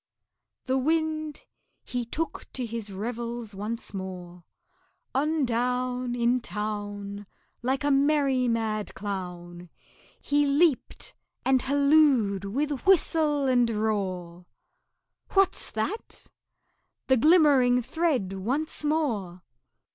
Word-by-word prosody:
The 260 0 +1
Wind, 310 +1 -1 0.4
he 245 -1 -3
took 320 +8 -4
to 255 - -3
his 225 -2 -6
revels 235 +2 -5
once 210 +3 -5
more; 180 -2 -7 0.7
On 300 +2 +1
down 250 +1 -1
In 240 +1 +2
town, 205 -2 -5 0.3
Like 265 +3 -1
a 290 - +2
merry 275 -2 +3
mad 220 -2 -1
clown, 180 -3 -6 0.5
He 290 0 +1
leaped 290 0 +1 0.3
and 260 -1 +4
hallooed 280 -8 +3
with 280 +6 -2
whistle 310 -6 +3
and 245 -3 +3
roar, 185 -5 -2 0.9
"What's 390 -1 +2
that?" 300 - -4 0.8
The 260 - +4
glimmering 270 -4 +5
thread 265 - 0
once 265 +13 -2
more! 225 - -1
245 Hz, 100 wpm, -27 LUFS, 205-290 Hz, 0.9 s, glimmering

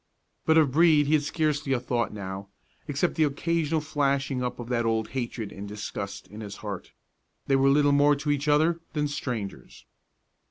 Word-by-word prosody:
But 160 0 +5
of 150 -4 +4
Brede 155 0 +5
he 145 - +1
had 155 - +4
scarcely 150 -1 0
a 125 - +1
thought 120 -2 -1
now, 100 -1 -6 0.4
except 145 +4 0
the 160 - +2
occasional 160 +2 0
flashing 140 -3 0
up 125 - -3
of 120 - -6
that 120 -2 +1
old 110 -1 0
hatred 120 -5 -4
and 100 +1 -7
disgust 100 -1 -6
in 105 +2 -9
his 100 -2 -7
heart. 100 -3 -6 0.5
They 135 - +2
were 135 0 +4
little 145 +1 +4
more 145 +1 +5
to 145 +1 -1
each 145 +1 -1
other 160 +3 +3
than 150 -2 0
strangers. 120 -8 -5
140 Hz, 185 wpm, -27 LUFS, 115-150 Hz, 0.5 s, But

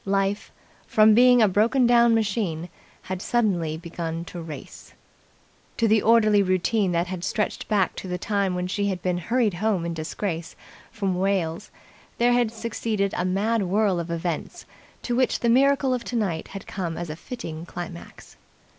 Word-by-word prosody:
Life, 195 +1 -1 0.4
from 215 0 +5
being 245 +1 +6
a - - +5
broken 225 +7 +3
down 235 -1 +5
machine, 195 -6 -1 0.3
had 185 0 -5
suddenly 180 -11 0
begun 165 0 -5
to 175 0 -8
race. 160 -2 -10 0.8
To 230 - +2
the 215 0 +4
orderly 215 -2 +4
routine 185 +1 +1
that 175 +1 -2
stretched 210 +2 -2
back 200 -5 +1
to - - -6
the 180 0 -3
time 200 -1 -1
when 180 0 -2
she 200 +2 -1
had 185 -3 -3
been 180 -1 0
hurried 230 +3 +1
home 190 -1 0
in 170 - -2
disgrace 165 +1 -4 0.4
from 195 -3 -1
Wales 185 -4 -1 0.5
there 240 +1 +3
had 240 -2 +2
succeeded 220 -3 -2
a - - -1
mad 205 +5 +1
whirl 195 0 +1
of 170 0 -5
events, 170 - -4 0.4
to 240 - -1
which 255 0 +1
the 235 - +2
miracle 270 +2 +3
of 250 -2 -2
tonight 205 -11 -2
had 195 -1 -9
come 175 -4 -4
as 170 -2 -4
a - - -5
fitting 170 -5 -7
climax. 175 -1 -9
195 Hz, 165 wpm, -24 LUFS, 175-225 Hz, 0.8 s, being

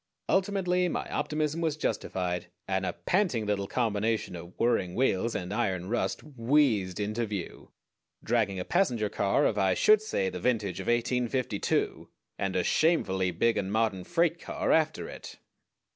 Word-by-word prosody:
Ultimately 185 -2 +1
my - - -3
optimism 150 +2 -1
was 160 -2 0
justified, 90 - -2 0.2
and 95 -1 0
a - - -2
panting 175 - 0
little 100 -1 -1
combination 110 -4 -1
of 85 +1 -10
whirring 95 -7 +1
wheels 115 -3 +1
and 90 +2 -3
iron 95 -5 -1
rust 120 - -1
wheezed 120 -8 +1
into 105 +3 -1
view, 100 -4 -6 0.5
dragging 110 -5 +1
a 90 - -3
passenger 125 - +1
car 100 -1 +1
of 105 - +1
I 95 -1 +3
should 215 - +5
say 100 - -1
the 90 - -5
vintage 105 -3 0
of - - -6
1852, 120 -1 0 0.3
and 95 -1 -1
a 90 - +2
shamefully 95 - +2
big 115 +7 +1
and 95 -1 -2
modern 110 -4 0
freight 170 - +1
car - - -2
after 155 -1 +2
it. - - -9
115 Hz, 155 wpm, -29 LUFS, 95-150 Hz, 0.5 s, should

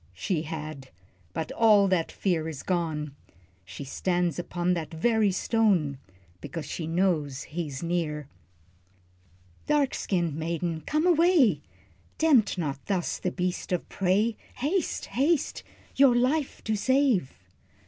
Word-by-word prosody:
She 155 - -1
had 155 -4 -6 0.4
but 160 - -4
all 210 -3 +5
that 175 -3 +1
fear 165 -5 -1
is 150 -4 -7
gone, 155 -5 -2 0.5
She 90 +10 -8
stands 175 +4 -1
upon 175 +1 -1
that 165 -3 -4
very 215 +5 +2
stone, 185 - +1 0.4
Because 165 -4 -6
she 160 +1 -5
knows 165 -6 0
he's 155 -3 -5
near. 160 -4 -2 1.4
"Dark 295 -2 +2
skinned 175 -5 -1
maiden, 165 +1 -2
come 305 +2 +1
away, 330 - +4 0.6
Tempt 265 -12 +4
not 140 -5 -3
thus 185 -4 -1
the 180 - -1
beast 180 0 -3
of 180 - -1
prey, 205 +4 +1 0.2
Haste, 310 +7 -1
haste, 285 +4 0 0.3
your 270 -3 +6
life 265 +4 0
to 220 - 0
save." 255 - +2
180 Hz, 125 wpm, -27 LUFS, 160-225 Hz, 1.4 s, your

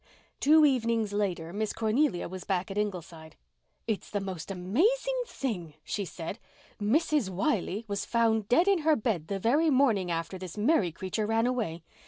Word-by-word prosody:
Two 310 +2 +6
evenings 230 -6 +1
later 180 -5 -2
Miss 215 +1 -2
Cornelia 225 -2 +1
was 185 +1 -7
back 190 0 -1
at 195 - -5
Ingleside. 170 -6 -5 0.5
"It's 220 -3 -3
the 205 - -1
most 190 -4 -6
amazing 380 - +1
thing!" 180 - -4
she 200 +5 -3
said. 180 +5 -6 0.4
"Mrs. 280 - +2
Wiley 200 - -1
was 200 -1 -2
found 225 -3 +1
dead 335 +10 +4
in 395 -3 +4
her 315 0 +3
bed 210 - -1
the 200 - -2
very 280 - +3
morning 245 -10 +3
after 165 +2 -3
this 185 +1 -8
Mary 210 - +2
creature 190 +5 -3
ran 225 +1 +2
away. 220 -10 -2
210 Hz, 165 wpm, -29 LUFS, 185-250 Hz, 0.5 s, Two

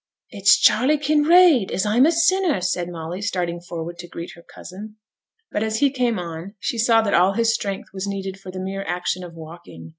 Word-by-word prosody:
'It's 200 -3 +4
Charley 255 +8 +3
Kinraid, 300 - +4
as 190 - -1
I'm 235 +7 +4
a - - +3
sinner!' 340 - +2
said 180 -1 -2
Molly, 170 +2 -6
starting 175 -4 -3
forward 170 0 -7
to 175 - -8
greet 170 0 -8
her 170 - -15
cousin. 205 +5 -11 0.6
But 210 - -2
as 220 0 -1
he 280 +3 +2
came 245 -4 0
on, 170 +3 -7
she 235 - -3
saw 225 0 +4
that 200 - -1
all 185 +3 +4
his 230 +2 +2
strength 200 -3 -4
was 195 +1 -5
needed 195 -1 -5
for 190 - -11
the 185 - -7
mere 195 +1 -4
action 180 0 -3
of 170 -2 -10
walking. 160 - -11
195 Hz, 205 wpm, -22 LUFS, 175-230 Hz, 0.6 s, It's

